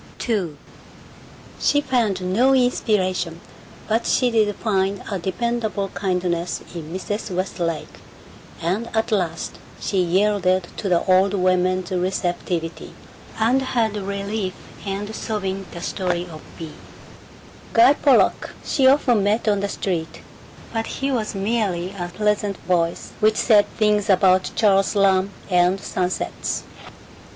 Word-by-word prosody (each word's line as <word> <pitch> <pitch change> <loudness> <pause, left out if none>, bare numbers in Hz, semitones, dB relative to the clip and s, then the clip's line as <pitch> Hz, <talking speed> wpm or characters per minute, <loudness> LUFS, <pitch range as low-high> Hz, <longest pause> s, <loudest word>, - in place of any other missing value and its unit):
II 185 -10 -1 1.0
She 290 - +3
found 235 -9 0
no 260 +6 +4
inspiration 185 -9 +1 0.5
but 225 +2 0
she 250 -2 +2
did 215 -3 +2
find 195 -2 -1
a 195 - -1
dependable 210 +2 -2
kindness 180 -3 -2
in 165 -2 -7
Mrs. 205 +4 -4
Westlake, 175 -3 -3 0.6
and 195 +8 -1
at 225 +1 0
last 175 -6 -2 0.2
she 195 -2 0
yielded 185 0 +2
to 200 - -2
the 175 -2 +3
old 190 +1 +4
woman's 185 0 +1
receptivity 175 -2 -2 0.4
and 235 +4 +3
had 230 -5 0
relief 200 0 -3 0.3
in 205 +2 -3
sobbing 195 -4 -3
the 170 - -8
story 180 -2 -2
of 155 -1 -9 0.2
Bea. 160 -2 -7 1.0
Guy 240 +4 +7
Pollock 280 -2 +2
she 270 -3 +3
often 260 -5 +4
met 210 +3 +1
on 205 -1 +3
the 200 0 -2
street, 170 -5 -3 0.5
but 225 0 -2
he 275 +1 -2
was 220 -5 -2
merely 195 -4 -1
a 180 -3 -5
pleasant 210 -1 0
voice 170 -2 0
which 215 0 +3
said 210 -3 +5
things 210 -2 +2
about 185 -1 +4
Charles 195 -2 +3
Lamb 195 -1 +3 0.2
and 180 +2 +3
sunsets. 185 -1 -2
195 Hz, 125 wpm, -22 LUFS, 180-220 Hz, 1.0 s, Guy